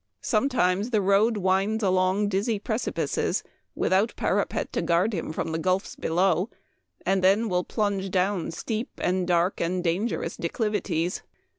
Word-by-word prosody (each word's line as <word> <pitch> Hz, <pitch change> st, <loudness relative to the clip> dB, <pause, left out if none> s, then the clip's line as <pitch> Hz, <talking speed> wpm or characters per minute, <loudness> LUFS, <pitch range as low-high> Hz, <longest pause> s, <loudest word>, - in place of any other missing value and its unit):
Sometimes 215 Hz, -4 st, +1 dB
the 220 Hz, -4 st, +2 dB
road 205 Hz, +3 st, +3 dB
winds 195 Hz, +3 st, +1 dB
along 185 Hz, +2 st, +2 dB
dizzy 205 Hz, +3 st, 0 dB
precipices, 220 Hz, +3 st, -1 dB, 0.3 s
without 195 Hz, +5 st, +1 dB
parapet -, -, -1 dB
to -, -, 0 dB
guard 175 Hz, +6 st, +2 dB
him 165 Hz, -4 st, -3 dB
from 160 Hz, -, -3 dB
the 160 Hz, -, -1 dB
gulfs 185 Hz, +3 st, 0 dB
below, 180 Hz, +3 st, +1 dB, 0.6 s
and 190 Hz, -1 st, +1 dB
then 200 Hz, +5 st, +4 dB
will 180 Hz, -3 st, 0 dB
plunge 200 Hz, -2 st, -1 dB
down 185 Hz, 0 st, 0 dB
steep 220 Hz, -, -3 dB
and 185 Hz, 0 st, 0 dB
dark 175 Hz, +1 st, +1 dB
and 180 Hz, +1 st, -1 dB
dangerous 185 Hz, +7 st, -1 dB
declivities. 180 Hz, -3 st, -1 dB
190 Hz, 140 wpm, -26 LUFS, 180-210 Hz, 0.6 s, then